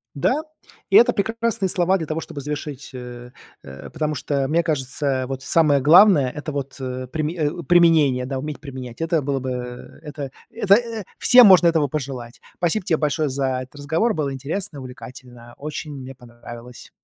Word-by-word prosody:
Да, 265 - +1 0.5
и - - +5
это 240 +1 +7
прекрасные 225 -1 -1
слова 180 +1 +2
для 165 -4 -4
того, 155 +2 -3
чтобы 160 -3 -8
завершить, 145 -1 -6
э, 125 -1 -9 0.3
э, 65 -1 -10
потому 155 -1 -2
что 140 -1 -1
мне 165 +5 +1
кажется, 145 -3 -2
э, 130 -2 0
вот, 135 0 -5
самое 150 -2 +3
главное- 160 0 +6
это 150 +1 -5
вот, 140 -1 -5
э, 130 0 -5
приме 155 +5 -3
о, 170 +3 -6
применение, 155 -6 +4
да, 135 0 -3
уметь 150 +2 -6
применять. 130 -3 -9
Это 165 -1 0
было 140 0 -1
бы 130 0 -4 0.5
это 145 -3 -7 0.2
это 205 -3 +4 0.4
всем 250 -2 +7
можно 185 -3 +7
этого 160 -4 +3
пожелать. 130 -4 -6 0.2
Спасибо 175 +3 0
тебе 170 -5 +1
большое 150 0 0
за 130 -1 -1
этот 130 +3 -14
разговор, 160 +11 0
было 145 -3 -2
интересно, 145 +3 -5
увлекательно, 125 -2 -12
очень 150 +1 -6
мне 135 -1 -9
понравилось. 120 -1 -12
145 Hz, 175 wpm, -22 LUFS, 130-165 Hz, 0.5 s, это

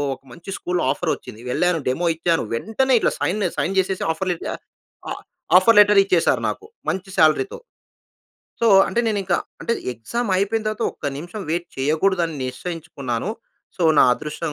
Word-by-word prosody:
ఒక - - -25
మంచి 170 +10 -12
స్కూల్‌లో 180 0 -2
ఆఫర్ 160 +3 -1
వచ్చింది. 110 - -12
వెళ్ళాను, 180 +4 +1
డెమో 170 +7 0
ఇచ్చాను, 165 0 +1
వెంటనే 245 - +1
ఇట్లా - - +2
సైన్, 200 +3 0
సైన్ 195 +3 -1
చేసేసి 190 0 -1
ఆఫర్ 185 +4 -3
లె 175 - -2 0.7
ఆహ్, - - -6 0.4
ఆఫర్ 225 +3 +4
లెటర్ 205 -1 +7
ఇచ్చేసారు 180 -4 +2
నాకు. - - -6 0.2
మంచి 190 +1 -3
సాలరీ‌తో. 275 - +3 1.1
సో, - - +4 0.2
అంటే 235 - +1
నేనింక 200 -5 0 0.3
అంటే, 235 - -1 0.2
ఎగ్జామ్ 205 - -4
అయిపోయిన 210 +3 0
తర్వాత, 215 +1 -2
ఒక్క - - -7
నిమిషం 175 +8 -7
వెయిట్ 170 +2 -1
చేయకూడదు, 160 +7 +1
అని 165 - -7
నిశ్చయించుకున్నాను. 140 - -4 0.5
సో, 180 - -2 0.2
నా - - +8
అదృష్టం 150 +4 -4
180 Hz, 155 wpm, -22 LUFS, 160-205 Hz, 1.1 s, నా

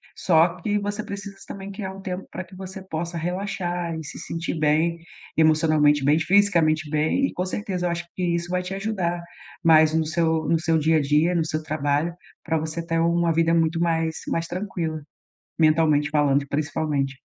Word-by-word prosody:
só 170 0 +3
que 205 +3 0
você 205 +1 -3
precisa 200 -1 -7
também 195 0 -7
criar 195 -1 -5
um 195 - -10
tempo 185 0 -5
para 185 - -5
que 185 +1 -15
você 190 +1 -8
possa 170 +1 -4
relaxar 175 -1 -3
e 160 - -5
se 140 - -9
sentir 165 0 -4
bem, 155 +3 +2 0.4
emocionalmente 155 -2 +4
bem, 145 +3 +4
fisicamente 165 -4 +3
bem. 155 - +1
E - - -8
com 180 - -2
certeza 185 -1 -3
eu - - 0
acho 170 0 -3
que 185 - -3
isso 170 +1 -3
vai 180 0 -1
te 180 +1 -5
ajudar, 195 -4 -2 0.4
mais 160 -2 +6
no 160 0 +2
seu 160 0 0
no 165 - +3
seu 165 0 +2
dia 160 +1 +3
a - - +2
dia, 150 +5 +2
no 165 -2 +1
seu 155 -1 -2
trabalho, 150 +2 0 0.3
para 160 -1 0
você 160 +2 -4
ter 165 0 0
uma 170 0 +2
vida 165 +1 +2
muito 165 0 +2
mais 165 -1 0
mais 165 0 -1
tranquila, 175 -4 -3 0.6
mentalmente 155 -2 +3
falando, 145 -2 +2
principalmente. 145 -2 -1
165 Hz, 185 wpm, -24 LUFS, 155-180 Hz, 0.6 s, mais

